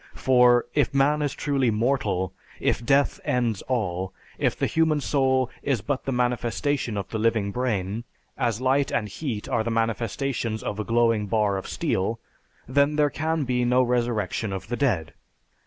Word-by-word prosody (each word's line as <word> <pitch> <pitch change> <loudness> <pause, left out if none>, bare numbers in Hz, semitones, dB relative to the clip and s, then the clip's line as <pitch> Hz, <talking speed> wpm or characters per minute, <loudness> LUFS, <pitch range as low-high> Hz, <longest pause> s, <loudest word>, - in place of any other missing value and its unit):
For, 125 -2 +4
if 145 -1 +1
man 145 +2 +3
is 145 -2 0
truly 140 -4 +1
mortal, 110 -5 0 0.3
if - - 0
death 140 +4 +2
ends 120 -5 0
all, 95 -7 -1 0.3
if - - +1
the - - +1
human 160 -2 +2
soul 130 -3 +1
is 135 -7 0
but 140 +3 -3
the 135 - -1
manifestation 125 0 -1
of 100 - -4
the 110 - -3
living 110 -2 +1
brain, 110 -3 -2 0.3
as 115 -3 0
light 135 +1 +2
and 105 - 0
heat 110 -1 -4
are 115 - 0
the 115 - -2
manifestations 115 +1 -1
of 105 - -4
a - - 0
glowing 115 -2 +2
bar 105 -1 +1
of 95 - -4
steel, 110 +5 -1 0.5
then 140 +3 +2
there 150 -1 +3
can 160 0 -1
be 125 -2 0
no 125 +1 +4
resurrection 120 -4 -1
of 95 +2 -6
the 120 - -1
dead. 100 - 0
120 Hz, 170 wpm, -25 LUFS, 110-135 Hz, 0.5 s, For